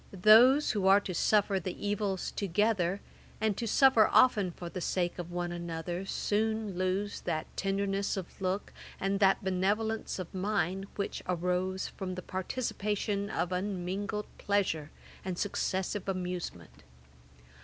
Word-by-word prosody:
Those 250 Hz, +7 st, +7 dB
who 200 Hz, -3 st, 0 dB
are 195 Hz, +1 st, +7 dB
to 185 Hz, -, -5 dB
suffer 200 Hz, +1 st, +2 dB
the 185 Hz, 0 st, -5 dB
evils 205 Hz, -2 st, -1 dB
together, 200 Hz, -1 st, 0 dB, 0.4 s
and 220 Hz, -2 st, +1 dB
to 230 Hz, -, -3 dB
suffer 245 Hz, -1 st, +6 dB
often 210 Hz, -7 st, +5 dB
for 175 Hz, 0 st, -8 dB
the 180 Hz, +1 st, -5 dB
sake 175 Hz, 0 st, -1 dB
of 175 Hz, -1 st, -5 dB
one 175 Hz, 0 st, -2 dB
another, 175 Hz, +2 st, -4 dB
soon 215 Hz, -1 st, -1 dB
lose 185 Hz, +3 st, -1 dB
that 155 Hz, -1 st, -2 dB
tenderness 195 Hz, 0 st, -1 dB
of 190 Hz, 0 st, -7 dB
look, 190 Hz, +2 st, -2 dB, 0.3 s
and 195 Hz, +1 st, 0 dB
that 195 Hz, -1 st, +4 dB
benevolence 205 Hz, +4 st, 0 dB
of 185 Hz, -3 st, -6 dB
mind, 195 Hz, -1 st, -1 dB
which 200 Hz, -, -3 dB
arose 180 Hz, +1 st, -1 dB
from 185 Hz, -1 st, -5 dB
the 180 Hz, -, -6 dB
participation 205 Hz, 0 st, -2 dB
of 180 Hz, -4 st, -1 dB
unmingled 195 Hz, +2 st, -2 dB
pleasure 185 Hz, -7 st, 0 dB, 0.3 s
and 185 Hz, -2 st, -4 dB
successive 195 Hz, 0 st, -2 dB
amusement. 180 Hz, -, -5 dB
195 Hz, 135 wpm, -31 LUFS, 180-205 Hz, 0.4 s, Those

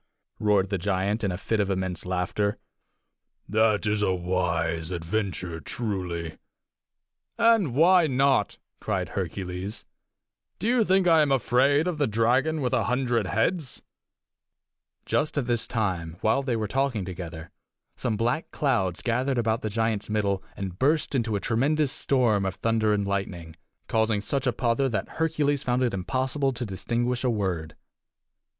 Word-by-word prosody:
roared 100 Hz, -2 st, +2 dB
the 100 Hz, -, 0 dB
giant, 100 Hz, +3 st, 0 dB
in 100 Hz, -, +1 dB
a 90 Hz, -, -3 dB
fit 110 Hz, +3 st, -1 dB
of 100 Hz, -1 st, +1 dB
immense 95 Hz, -1 st, -2 dB
laughter. 95 Hz, +3 st, -1 dB, 0.9 s
"That 110 Hz, 0 st, +2 dB
is 105 Hz, 0 st, +1 dB
a 100 Hz, -, +2 dB
wise 85 Hz, -2 st, -1 dB
adventure, 90 Hz, -1 st, -3 dB
truly!" 90 Hz, -6 st, -4 dB, 1.0 s
"And 225 Hz, -, +3 dB
why 170 Hz, +2 st, +5 dB
not?" 135 Hz, -5 st, +2 dB, 0.2 s
cried -, -, -2 dB
Hercules. 95 Hz, +2 st, -4 dB, 0.7 s
"Do 215 Hz, -, -2 dB
you 240 Hz, -1 st, +4 dB
think 190 Hz, -1 st, +3 dB
I 165 Hz, -2 st, +6 dB
am 145 Hz, -2 st, +2 dB
afraid 135 Hz, +4 st, +3 dB
of 170 Hz, -4 st, -2 dB
the 145 Hz, -, +2 dB
dragon 130 Hz, +8 st, +2 dB
with 125 Hz, -2 st, -1 dB
a -, -, +2 dB
hundred 125 Hz, -4 st, 0 dB
heads?" 130 Hz, -, -1 dB, 1.2 s
Just 150 Hz, -, 0 dB
at 140 Hz, -, +1 dB
this 120 Hz, -2 st, 0 dB
time, 90 Hz, -7 st, -2 dB
while 110 Hz, +5 st, +2 dB
they 130 Hz, -3 st, -1 dB
were 110 Hz, -2 st, -1 dB
talking 130 Hz, -4 st, 0 dB
together, 85 Hz, -3 st, -7 dB, 0.4 s
some 115 Hz, -4 st, -1 dB
black 120 Hz, +8 st, 0 dB
clouds 100 Hz, -, 0 dB
gathered 125 Hz, +3 st, 0 dB
about 115 Hz, -1 st, +1 dB
the 110 Hz, -, -2 dB
giant's 110 Hz, -1 st, -1 dB
middle 100 Hz, -2 st, 0 dB, 0.2 s
and 95 Hz, -1 st, -5 dB
burst 150 Hz, +4 st, +2 dB
into 115 Hz, -5 st, 0 dB
a -, -, 0 dB
tremendous 140 Hz, +7 st, +1 dB
storm 120 Hz, -7 st, +2 dB
of 95 Hz, -1 st, -2 dB
thunder 110 Hz, -1 st, +1 dB
and 100 Hz, -1 st, +1 dB
lightning, 90 Hz, -5 st, -3 dB, 0.3 s
causing 110 Hz, -1 st, +1 dB
such 135 Hz, +6 st, -2 dB
a -, -, +4 dB
pother 120 Hz, +3 st, +1 dB
that 110 Hz, -, -2 dB
Hercules 150 Hz, -3 st, +1 dB
found 125 Hz, +1 st, 0 dB
it 120 Hz, -, 0 dB
impossible 130 Hz, +8 st, -1 dB
to 125 Hz, 0 st, -4 dB
distinguish 120 Hz, +5 st, -2 dB
a 130 Hz, -, +2 dB
word. 90 Hz, -8 st, -2 dB
110 Hz, 155 wpm, -26 LUFS, 95-130 Hz, 1.2 s, I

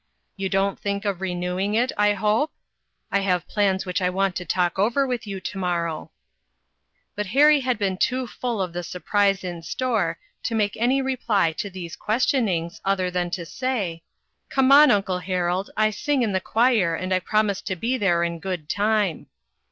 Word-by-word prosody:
You 195 Hz, -1 st, -3 dB
don't 195 Hz, 0 st, 0 dB
think 200 Hz, 0 st, -3 dB
of 195 Hz, -3 st, -2 dB
renewing 180 Hz, +2 st, -1 dB
it, 245 Hz, +3 st, +2 dB
I 210 Hz, 0 st, +3 dB
hope? 210 Hz, +9 st, +1 dB, 0.6 s
I 200 Hz, -, +3 dB
have 180 Hz, -3 st, 0 dB
plans 195 Hz, -3 st, +1 dB
which 180 Hz, +1 st, -2 dB
I 180 Hz, -, +2 dB
want 190 Hz, 0 st, 0 dB
to 180 Hz, -, -5 dB
talk 180 Hz, +1 st, 0 dB
over 235 Hz, +7 st, +2 dB
with 245 Hz, -4 st, -3 dB
you 195 Hz, -1 st, -4 dB
to 195 Hz, -, -6 dB
morrow? 170 Hz, -3 st, -2 dB, 0.5 s
" -, -, -48 dB
But 210 Hz, -1 st, -3 dB
Harry 290 Hz, +8 st, +5 dB
had 255 Hz, -3 st, 0 dB
been 195 Hz, -3 st, -1 dB
too 255 Hz, +5 st, 0 dB
full 235 Hz, -4 st, -3 dB
of 180 Hz, -2 st, -6 dB
the 175 Hz, -, -3 dB
sur 180 Hz, +1 st, -7 dB
prise 200 Hz, 0 st, +2 dB
in 175 Hz, -2 st, -5 dB
store, 210 Hz, -4 st, -1 dB, 0.2 s
to 230 Hz, -, -2 dB
make 205 Hz, -2 st, +1 dB
any 255 Hz, +4 st, +1 dB
reply 235 Hz, -9 st, +1 dB
to 200 Hz, +5 st, -5 dB
these 180 Hz, -3 st, -7 dB
questionings, 210 Hz, -7 st, 0 dB
other 190 Hz, -2 st, 0 dB
than 175 Hz, -1 st, -1 dB
to 170 Hz, -1 st, -4 dB
say: 200 Hz, -7 st, -3 dB, 0.3 s
" -, -, -51 dB
Come 270 Hz, 0 st, +3 dB
on, 295 Hz, +1 st, +9 dB
uncle 195 Hz, -4 st, +1 dB
Harold; 180 Hz, +1 st, -1 dB
I 215 Hz, 0 st, +3 dB
sing 275 Hz, +4 st, 0 dB
in 220 Hz, -, 0 dB
the 190 Hz, -1 st, 0 dB
choir, 220 Hz, -6 st, +2 dB
and 185 Hz, +2 st, -2 dB
I 185 Hz, -, +3 dB
promised 205 Hz, +1 st, 0 dB
to 190 Hz, -, -1 dB
be 230 Hz, +8 st, -1 dB
there 185 Hz, -7 st, +2 dB
in 170 Hz, -1 st, -2 dB
good 170 Hz, -3 st, -5 dB
time." 205 Hz, -4 st, 0 dB
195 Hz, 195 wpm, -24 LUFS, 180-220 Hz, 0.6 s, on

